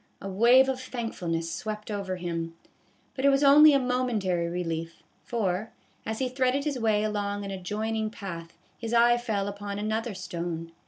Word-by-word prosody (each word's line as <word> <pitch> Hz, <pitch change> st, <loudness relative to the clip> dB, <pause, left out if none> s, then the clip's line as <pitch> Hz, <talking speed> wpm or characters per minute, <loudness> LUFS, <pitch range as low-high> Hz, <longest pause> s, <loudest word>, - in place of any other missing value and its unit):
A 195 Hz, -, -7 dB
wave 235 Hz, +7 st, +5 dB
of 260 Hz, -1 st, -2 dB
thankfulness 175 Hz, -10 st, -3 dB
swept 215 Hz, 0 st, -5 dB
over 200 Hz, -2 st, -3 dB
him; 165 Hz, -2 st, -4 dB, 0.6 s
but 265 Hz, -, -5 dB
it 280 Hz, -, +6 dB
was 275 Hz, +1 st, +3 dB
only 295 Hz, +2 st, +9 dB
a 280 Hz, -, +5 dB
momentary 240 Hz, -9 st, 0 dB
relief, 165 Hz, -1 st, -4 dB, 0.2 s
for, 210 Hz, -2 st, -1 dB, 0.4 s
as 220 Hz, 0 st, -2 dB
he 260 Hz, -, 0 dB
threaded 255 Hz, +2 st, +1 dB
his 285 Hz, -4 st, -2 dB
way 215 Hz, -2 st, +2 dB
along 205 Hz, -1 st, -2 dB
an 195 Hz, -, -5 dB
adjoining 215 Hz, +3 st, -2 dB
path, 170 Hz, -6 st, -8 dB, 0.2 s
his 230 Hz, 0 st, -2 dB
eye 240 Hz, +1 st, +6 dB
fell 210 Hz, -5 st, -1 dB
upon 200 Hz, 0 st, -5 dB
another 215 Hz, +1 st, -2 dB
stone. 170 Hz, -2 st, -5 dB
210 Hz, 165 wpm, -27 LUFS, 185-240 Hz, 0.6 s, only